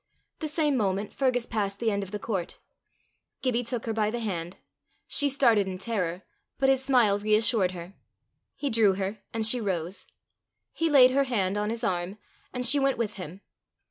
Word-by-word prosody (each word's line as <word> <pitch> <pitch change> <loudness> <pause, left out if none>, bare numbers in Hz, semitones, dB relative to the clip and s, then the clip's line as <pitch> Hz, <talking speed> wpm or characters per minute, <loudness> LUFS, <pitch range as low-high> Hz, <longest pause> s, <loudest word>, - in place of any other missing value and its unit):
The 315 - -3
same 300 -2 +1
moment 200 -1 -1
Fergus 255 -3 +1
passed 200 -3 -2
the 225 +1 0
end 200 0 -1
of 195 - -6
the 210 - -4
court. 200 -5 -4 0.9
Gibbie 245 -2 +1
took 235 -1 -4
her 225 - -2
by 215 -1 +1
the 240 +2 -3
hand. 180 -5 -4 0.5
She 285 -1 +2
started 235 -7 +3
in 185 -1 -4
terror, 185 -4 -3 0.3
but 270 -1 +2
his 265 -1 +2
smile 240 -7 +3
reassured 215 -2 +2
her. 175 +1 -9 0.6
He 285 - -3
drew 220 -3 +4
her, 195 +2 -3
and 225 -1 -1
she 240 +2 +3
rose. 185 -2 -3 0.7
He 330 0 0
laid 260 -4 +7
her 275 +1 +2
hand 200 -7 0
on 210 0 -1
his 230 +1 -4
arm, 185 -1 -2 0.3
and 250 0 -3
she 285 +4 +5
went 275 -1 +1
with 220 -3 -3
him. 180 +1 -8
220 Hz, 185 wpm, -27 LUFS, 195-250 Hz, 0.9 s, laid